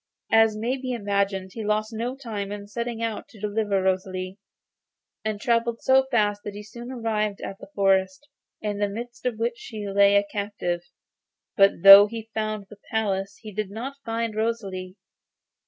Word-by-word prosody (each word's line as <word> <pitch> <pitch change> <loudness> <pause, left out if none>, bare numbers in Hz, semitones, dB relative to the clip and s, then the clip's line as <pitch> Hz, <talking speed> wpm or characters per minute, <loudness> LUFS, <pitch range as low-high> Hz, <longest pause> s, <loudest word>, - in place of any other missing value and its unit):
As 225 -1 +5
may 240 +5 -1
be 255 -1 -4
imagined, 200 -3 -1
he 225 - -5
lost 215 +1 0
no 235 +4 -3
time 215 -7 -5
in 205 -1 -6
setting 235 +2 -4
out 225 -2 -3
to 220 - -16
deliver 205 -1 0
Rosalie, 185 0 -2 0.8
and 215 -1 -2
travelled 235 0 0
so 265 0 +4
fast 210 -4 +1
that 205 - -6
he 210 - -7
soon 235 +4 -9
arrived 215 -4 -1
at 195 - -7
the - - -12
forest, 190 +4 +2 0.4
in 205 -1 -2
the 205 -1 +1
midst 240 +4 -6
of 235 -3 -2
which 235 +1 -2
she 215 -3 -7
lay 200 0 +5
a 200 - +5
captive. 200 -4 -3 0.7
But 195 -4 +4
though 195 +1 +11
he 225 0 -8
found 215 -2 -2
the 205 0 -14
palace 195 -3 -1
he 215 - -7
did 210 0 -3
not 250 +7 -6
find 230 -1 -2
Rosalie. 195 -5 -3
210 Hz, 170 wpm, -25 LUFS, 200-230 Hz, 0.8 s, though